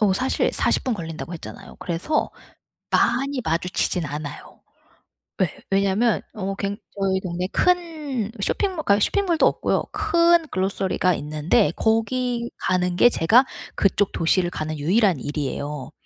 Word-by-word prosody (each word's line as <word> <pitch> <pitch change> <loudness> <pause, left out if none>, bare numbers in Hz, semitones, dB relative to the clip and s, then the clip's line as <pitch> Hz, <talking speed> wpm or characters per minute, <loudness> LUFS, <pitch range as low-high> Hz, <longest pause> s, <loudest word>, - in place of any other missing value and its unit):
어 205 -3 +4
사실 255 +8 0
40 - - +1
분 255 - 0
걸린다고 165 -2 -6
했잖아요. 160 - -10
그래서 185 - -1 0.6
많이 270 +2 +1
마주치진 170 0 0
않아요. 145 0 -8 0.8
예. 185 - +4 0.2
왜냐면 200 +4 +2
어 195 -1 -3
굉 200 +1 -3 0.2
저희 190 -1 +1
동네에 180 0 -3
큰 310 - 0
쇼핑모 375 -6 -1
그러니까 200 +1 +3
쇼핑몰도 350 - +2
없고요. - - 0
큰 340 -5 +3
글로서리가 185 -1 0
있는데 150 +1 +1
거기 235 +2 0 0.2
가는 180 -1 +1
게 240 +6 +6
제가 235 +8 +4 0.3
그쪽 200 0 +2
도시를 175 +2 +1
가는 155 -2 -4
유일한 185 - +2
일이에요. 145 0 -4
195 Hz, 300 characters per minute, -23 LUFS, 170-255 Hz, 0.8 s, 게